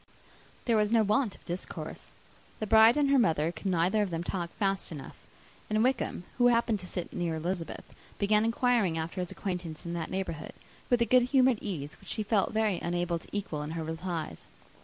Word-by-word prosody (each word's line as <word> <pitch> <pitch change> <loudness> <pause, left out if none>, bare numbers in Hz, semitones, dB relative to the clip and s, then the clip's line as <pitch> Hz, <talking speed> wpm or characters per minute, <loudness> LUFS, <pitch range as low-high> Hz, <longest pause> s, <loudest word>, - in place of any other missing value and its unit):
There 230 -2 +3
was 210 0 +2
no 230 -1 +5
want 210 +1 +1
of - - -21
discourse. 175 +1 -6 0.5
The 215 - -1
bride 220 +4 +7
and 285 -2 +3
her 275 - +6
mother 160 -7 +2
could 185 - -6
neither 185 +4 +2
of 205 - 0
them 165 -1 -3
talk 175 -1 -3
fast 195 -3 -1
enough; 145 -4 -8 0.5
and 215 +1 +2
Wickham, 250 -8 0 0.2
who 245 - +6
happened 230 -3 +2
to 180 - -9
sit 175 -1 -5
near 170 -2 -1
Elizabeth, 170 +1 -3 0.3
began 210 +1 +3
inquiring 230 -6 +2
after 165 +3 -3
his 180 - -3
acquaintance 180 -5 -5
in 170 - -4
that 165 -2 -3
neighbourhood, 185 -5 -4 0.4
with 245 -1 +4
a - - 0
good 255 +1 +5
humoured 255 -3 +4
ease, 150 -8 -5
which - - -11
she 215 - -1
felt 205 -2 +1
very 215 -4 +1
unable 175 0 -1
to - - -13
equal 195 -7 -3
in 150 - -4
her 160 - -2
replies. 160 0 -4
190 Hz, 200 wpm, -30 LUFS, 170-220 Hz, 0.5 s, bride